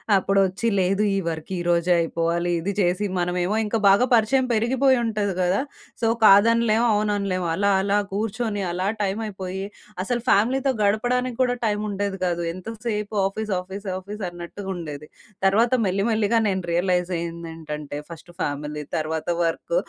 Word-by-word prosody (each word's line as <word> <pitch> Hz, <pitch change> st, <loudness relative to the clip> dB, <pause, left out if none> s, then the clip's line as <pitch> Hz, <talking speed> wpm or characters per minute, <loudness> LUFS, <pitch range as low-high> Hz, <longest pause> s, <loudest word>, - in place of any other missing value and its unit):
అప్పుడొచ్చి 195 Hz, +3 st, +1 dB
లేదు 195 Hz, +3 st, +2 dB
ఈ -, -, +1 dB
వర్క్ 160 Hz, 0 st, -4 dB
ఈరోజే 175 Hz, 0 st, +1 dB
అయిపోవాలి. 170 Hz, +1 st, 0 dB
ఇది 195 Hz, +5 st, -2 dB
చేసి 180 Hz, +2 st, +1 dB
మనమేమో 180 Hz, +3 st, 0 dB
ఇంకా 215 Hz, +2 st, -1 dB
బాగా 200 Hz, +6 st, +6 dB
పరిచయం 240 Hz, +4 st, +3 dB
పెరిగిపోయి 255 Hz, +4 st, +3 dB
ఉంటది 210 Hz, -4 st, -1 dB
గదా! 180 Hz, +2 st, +2 dB, 0.4 s
సో 225 Hz, -, +2 dB, 0.2 s
కాదనలేం 225 Hz, +3 st, +5 dB
అవుననలేము. 200 Hz, -4 st, 0 dB
అలా 200 Hz, +3 st, +1 dB
అలా 200 Hz, +1 st, +1 dB
కూర్చొని 215 Hz, 0 st, -2 dB
అలా 185 Hz, +2 st, -1 dB
టైమ్ 200 Hz, +2 st, -1 dB
అయిపోయి. 190 Hz, -1 st, -5 dB, 0.4 s
అసలు 240 Hz, +3 st, -1 dB
ఫ్యామిలీతో 260 Hz, +6 st, +3 dB
గడపడానికి 245 Hz, +4 st, +1 dB
కూడా 245 Hz, -1 st, +2 dB
టైమ్ 210 Hz, 0 st, 0 dB
ఉండేది 200 Hz, -1 st, -3 dB
గాదు. 175 Hz, -1 st, -1 dB
ఎంత 185 Hz, +4 st, -10 dB, 0.2 s
సేపు 210 Hz, -1 st, -2 dB
ఆఫీస్, 215 Hz, +2 st, -3 dB
ఆఫీస్, 195 Hz, +2 st, -8 dB
ఆఫీస్ 205 Hz, +3 st, -8 dB
అన్నట్టుగ 175 Hz, +3 st, -9 dB
ఉండేది. 150 Hz, -3 st, -7 dB, 0.4 s
తర్వాత 225 Hz, +5 st, +3 dB
మెల్లి 195 Hz, +2 st, 0 dB
మెల్లిగా 220 Hz, +1 st, +2 dB
నేను 190 Hz, -2 st, -1 dB
రియలైజ్ 180 Hz, +1 st, +1 dB
అయ్యిందేంటంటే 160 Hz, -3 st, -6 dB
ఫస్ట్ 170 Hz, +1 st, -11 dB
ఫ్యామిలీ 150 Hz, +1 st, -3 dB
తర్వాత 155 Hz, +1 st, -3 dB, 0.2 s
వర్క్. 315 Hz, -, -2 dB
195 Hz, 145 wpm, -23 LUFS, 175-215 Hz, 0.4 s, బాగా